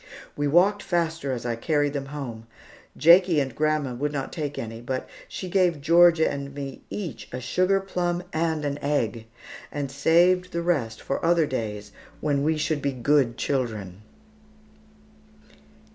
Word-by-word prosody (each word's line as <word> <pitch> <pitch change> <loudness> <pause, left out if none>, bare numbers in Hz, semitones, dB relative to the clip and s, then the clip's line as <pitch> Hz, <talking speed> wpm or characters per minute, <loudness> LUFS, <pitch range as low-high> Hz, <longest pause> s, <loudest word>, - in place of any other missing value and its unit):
We 145 0 0
walked 190 +7 +4
faster 165 -5 -1
as 125 -2 -4
I 120 -1 -1
carried 145 +4 0
them 140 -1 -4
home. 125 -6 -7 0.5
Jakie 170 0 +6
and 135 -3 -2
grandma 155 -4 0
would 145 +4 -2
not 140 -2 -4
take 150 -4 -4
any, 115 0 -6
but 130 +2 -4 0.2
she 185 - -6
gave 180 -4 +2
Georgia 170 +2 +5
and 140 0 -5
me 140 -2 -6
each 180 - -6
a 125 - -4
sugar 185 +9 +1
plum 180 -2 -2
and 160 -1 0
an 145 0 -2
egg, 115 -6 -1 0.4
and 140 -2 -4
saved 180 +5 +3
the 170 0 -1
rest 130 -11 -1
for 135 - -3
other 165 -1 +3
days 105 -6 -4 0.3
when 145 -2 0
we 155 +2 +1
should 155 -1 -1
be 140 - 0
good 125 -1 +2
children. 110 -9 -3
145 Hz, 155 wpm, -25 LUFS, 130-170 Hz, 0.5 s, Jakie